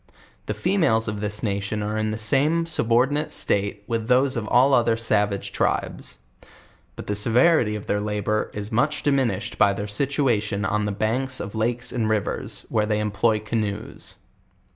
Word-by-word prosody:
The 105 - -2
females 145 - +1
of 105 -1 -4
this 105 +1 -3
nation 100 0 -2
are 105 +1 -3
in 110 0 -1
the 110 - -3
same 145 +10 +1
subordinate 145 0 +1
state 100 -3 +1
with 115 -1 -3
those 130 +2 +3
of 115 -2 -2
ail 130 +5 +4
oth 120 -2 +3
er 115 -1 +2
savage 105 -3 0
tribes; - - -2 0.8
but - - -8
the 105 - -2
severity 115 +2 +3
of 105 - -6
their 105 0 -1
labor 105 0 -1
is 105 +2 -6
much 135 +7 0
di 145 - +2
minished 115 -6 -1
by 100 -1 +5
their 100 +1 -4
situation 110 -4 0
on 105 +2 0
the 105 - -1
banks 125 +6 -1
of 100 - -6
lakes 120 +3 -2
and 115 -3 -1
rivers, 110 -2 -2
where 105 -1 0
they 105 -1 0
employ 105 +1 +1
canoes. 110 -1 -4
110 Hz, 175 wpm, -23 LUFS, 105-125 Hz, 0.8 s, by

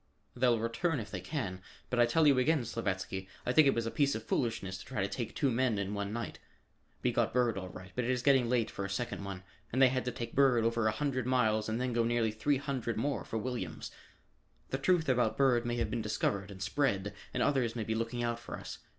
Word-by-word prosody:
"They'll 125 -1 +3
return 130 +7 0
if 110 -2 -7
they 95 - -4
can, 95 - -4 0.3
but 125 - +1
I 120 - +6
tell 160 +6 +3
you 140 -3 +6
again, 145 -1 +2
Slavatsky, 95 -4 -3 0.2
I - - +1
think 155 0 +7
it 135 - +4
was 115 -1 0
a 115 - -2
piece 140 -1 +2
of 110 - -4
foolishness 110 -6 -1
to - - -10
try 130 -3 -4
to - - +1
take 115 +2 -4
two 140 -4 +2
men 120 -2 +1
in 100 0 -2
one 100 0 -3
night. 115 +1 -4 0.6
We - - +3
got - - 0
Bird 120 -2 +3
all 95 -1 -5
right, 95 0 -10
but 125 - -1
it - - -1
is 125 -1 0
getting 130 -4 +4
late 120 -3 +1
for 100 - -4
a 100 - -3
second 100 +1 -3
one, 95 -1 -6 0.3
and 130 - 0
they 135 -1 +7
had 130 0 -1
to 125 - -1
take 120 -1 -6
Bird 130 -4 +4
over 115 -1 +2
a - - +3
hundred 130 +1 -1
miles 110 -4 +2
and 110 +2 -1
then 125 -1 -1
go 115 0 +2
nearly 115 -1 +1
three 120 +7 +1
hundred 130 -4 -3
more 140 +5 -1
for 115 - -4
Williams. 125 +2 -4 0.8
The 135 - -2
news 175 -4 +4
about 125 -2 +2
Bird 125 -3 +3
may 120 - 0
have 115 -3 -1
been 115 - -1
discovered 100 -2 -1
and 95 -1 -6
spread 105 -3 0 0.2
and - - 0
others 125 -5 +1
may 115 - -2
be 110 - -1
looking 115 +2 -2
out 120 0 -1
for - - -7
us. - - -8
120 Hz, 250 wpm, -32 LUFS, 110-130 Hz, 0.8 s, think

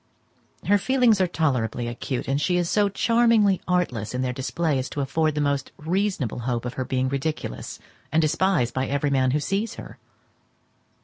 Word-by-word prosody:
Her 205 0 +4
feelings 245 -3 +3
are 185 - +3
tolerably 125 -8 -1
acute, 120 +2 -4
and 140 +2 0
she 180 +3 +1
is 175 -1 0
so 205 +2 +2
charmingly 225 -2 +3
artless 125 - -1
in 130 - -1
their 125 -1 -1
display 140 +3 -1
as 130 - -4
to 145 - -3
afford 155 +3 0
the 150 - 0
most 140 -1 -1
reasonable 175 - -1
hope 120 0 -2
of 125 - -4
her 130 - -3
being 130 +1 0
ridiculous, 140 +4 -4 0.3
and 160 - +3
despised 160 -4 +1
by 130 0 -1
every 140 +1 0
man 130 -1 +2
who 145 +4 +1
sees 195 +8 -2
her. - - -10
150 Hz, 180 wpm, -24 LUFS, 130-185 Hz, 0.3 s, Her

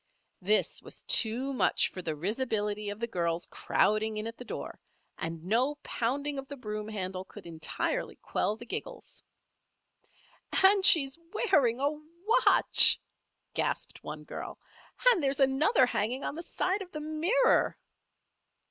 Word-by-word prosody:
This 210 +4 +1
was - - -9
too 250 +5 +3
much 255 - +2
for 185 - -7
the 160 -3 -3
risibility 210 - -2
of 205 +1 -6
the 235 - -1
girls 170 -6 -2
crowding 215 +1 +1
in 215 - -3
at 230 0 -5
the 250 - -10
door, - - -7 0.4
and 165 0 -5
no 245 +9 +1
pounding 280 +4 -2
of 270 - -8
the 285 - -8
broom 210 -3 -5
handle 190 -3 -4
could - - -13
entirely 170 - -3
quell 210 - -2
the 235 - -11
giggles. - - -6 1.4
"And 390 0 +6
she's 275 -4 +5
wearing 280 - +2
a 285 +2 +1 0.6
watch!" - - +6 0.5
gasped - - -3
one - - -7
girl. - - -7 0.5
"And 390 - +1
there's 275 0 0
another 270 - +4
hanging 245 +2 -2
on - - -3
the 325 - -6
side 375 +3 -2
of 365 -2 -9
the 305 - -6
mirror." 335 +11 +2
240 Hz, 145 wpm, -29 LUFS, 210-290 Hz, 1.4 s, And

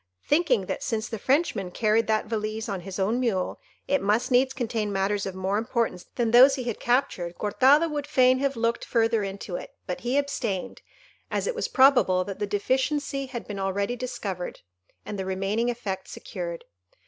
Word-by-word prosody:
Thinking 295 - +3
that - - -4
since 225 -2 -2
the 225 - -5
Frenchman 265 - +1
carried 215 +4 +1
that 220 -1 +1
valise 215 0 -3
on 195 -4 -3
his 190 +1 -7
own 210 +5 +1
mule, 215 -8 -1 0.3
it 280 0 +2
must 220 +6 +1
needs 255 +1 +4
contain 230 -5 -2
matters 195 +1 0
of 190 - -5
more 190 +2 0
importance 225 -5 -2
than 235 -2 +1
those 260 +3 +8
he 260 - -4
had 235 -3 -3
captured, 190 -9 0
Cortado 265 +10 +4
would 295 -2 -4
fain 255 0 +4
have 275 0 0
looked 230 +1 0
further 225 -1 +2
into 195 -2 -4
it, - - -10
but 180 - -4
he 245 +3 0
abstained, 240 -9 -2 0.5
as - - -1
it - - -1
was 465 - -2
probable 260 -9 +5
that 195 0 -7
the 205 - -1
deficiency 270 +6 0
had 245 -3 -7
been 205 -2 -5
already 200 +4 -1
discovered, 230 -8 -5 0.4
and 205 - -5
the - - -1
remaining 195 +5 0
effects 200 -6 -4
secured. - - -6
225 Hz, 185 wpm, -26 LUFS, 200-260 Hz, 0.5 s, those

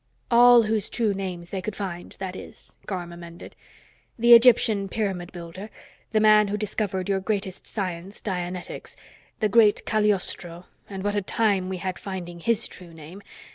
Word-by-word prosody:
"All 240 0 +7
whose 215 -2 -1
true 220 -4 0
names 180 -3 -6
they 190 - -3
could 215 +1 -5
find, 180 -3 -6
that 190 -1 -5
is," - - -12
Garm 175 -3 -5
amended. 170 0 -11 0.6
"The 235 +1 +6
Egyptian 230 -4 +5
pyramid 190 -5 -3
builder, 175 +4 -9 0.4
the 220 - +2
man 215 -1 +6
who 205 +1 -2
discovered 200 -2 -2
your 195 -1 +1
greatest 195 -2 -4
science, 185 -1 -5
dianetics, 180 -2 -5 0.5
the 215 - +3
great 210 0 +4
Cagliostro 190 -4 -1 0.2
and 195 -2 -6
what 205 0 0
a 205 - 0
time 195 -2 0
we 190 - -3
had 185 0 -4
finding 175 -3 -7
his 230 +5 0
true 170 -2 -13
name! 165 +5 -11
195 Hz, 160 wpm, -25 LUFS, 180-215 Hz, 0.6 s, All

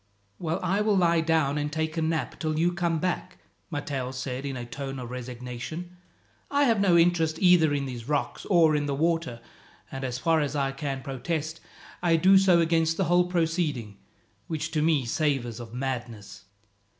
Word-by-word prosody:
"Well, 165 +1 -2
I 190 +3 +1
will 210 -1 +2
lie 170 -2 +3
down 155 -3 +1
and 150 0 -2
take 160 0 -2
a 165 - -1
nap 160 0 -2
till 155 -1 -1
you 170 +2 +2
come 170 -2 0
back," 180 +2 -3 0.3
Matteo 145 -5 -3
said 130 +1 -4
in 135 -2 -4
a 120 - -5
tone 135 +2 -6
of 125 -2 -7
resignation. 125 +8 -6 0.5
"I 285 0 +2
have 230 -6 +3
no 180 -4 +5
interest 165 -2 +3
either 175 -4 +5
in 140 -1 -1
these 125 -1 -7
rocks 145 -1 -1
or 165 -5 +5
in 145 -1 0
the 140 - -1
water; 165 -6 -1 0.5
and 135 0 -5
as 125 -2 -2
far 160 +4 +2
as 145 0 -2
I 135 -1 0
can 135 -1 -4
protest, 155 +3 -3 0.4
I 170 -2 +3
do 190 +4 +6
so 185 -3 +5
against 165 -1 +2
the 195 - +2
whole 175 +1 +3
proceeding, 160 - -1 0.5
which 160 0 -3
to 155 - 0
me 155 -4 +2
savours 125 -3 -1
of 115 -2 -9
madness." 120 -6 -5
155 Hz, 185 wpm, -27 LUFS, 135-170 Hz, 0.5 s, do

